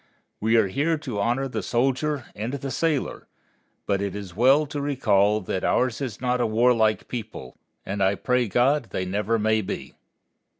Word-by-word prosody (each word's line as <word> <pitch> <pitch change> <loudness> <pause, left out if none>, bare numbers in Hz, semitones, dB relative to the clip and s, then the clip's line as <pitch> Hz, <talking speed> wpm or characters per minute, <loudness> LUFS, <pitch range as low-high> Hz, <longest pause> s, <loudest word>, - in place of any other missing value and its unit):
We 110 +2 +2
are 110 - +5
here 155 - 0
to 130 -9 -5
honor 120 +6 0
the 115 -4 -3
soldier 130 +5 0
and 110 +5 -4
the 135 -1 -4
sailor; 160 -3 -1 0.6
but 100 -1 0
it 100 -1 -3
is 100 -4 -7
well 135 +7 +5
to 145 0 -5
recall 105 -7 +2
that 95 0 -3
ours 125 0 +1
is 125 -6 -4
not 125 0 0
a - - +2
warlike 110 -1 +2
people, 110 - -7 0.3
and 100 +1 -3
I 95 +1 +3
pray 125 +2 +1
God 125 +7 +2
they 95 - -3
never 105 +4 0
may 110 0 +2
be. 95 - -6
115 Hz, 175 wpm, -24 LUFS, 105-135 Hz, 0.6 s, are